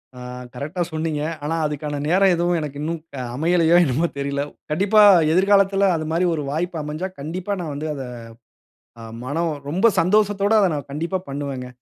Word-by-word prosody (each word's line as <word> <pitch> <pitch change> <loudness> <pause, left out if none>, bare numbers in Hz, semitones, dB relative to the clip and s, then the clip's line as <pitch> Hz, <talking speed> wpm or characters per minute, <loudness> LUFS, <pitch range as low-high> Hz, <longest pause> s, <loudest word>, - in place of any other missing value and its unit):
ஆ. - - -10 0.3
Correct 150 +8 -6
ஆ - - +4
சொன்னீங்க. 155 -2 -2 0.2
ஆனா 160 +2 -1
அதுக்கான 150 0 -4
நேரம் 190 +2 +4
எதுவும் 175 0 +1
எனக்கு 145 -1 -6
இன்னும் 165 +1 -3 0.2
அ - - -3
அமையலயோ! 170 +2 +3
என்னமோ! 150 +6 +1
தெரியல. 140 0 -2 0.3
கண்டிப்பா 205 +6 +4 0.3
எதிர்காலத்தில 195 +1 +4
அது 155 -1 -3
மாரி 170 +3 +1
ஒரு 150 - -3
வாய்ப்பு 170 +1 -2
அமஞ்சா, 155 +6 -4
கண்டிப்பா 180 +7 -4
நான் 155 -4 -4
வந்து 155 +2 -4
அத 135 -2 -5 1.0
அ - - -9 0.2
மனம் 160 +4 -1 0.2
ரொம்ப 190 +9 +1
சந்தோசத்தோட 205 +2 +2
அத 195 - +4
நான் 145 -1 -6
கண்டிப்பா 170 +6 -2
பண்ணுவேங்க. 135 -2 -4
165 Hz, 170 wpm, -22 LUFS, 145-185 Hz, 1.0 s, ஆ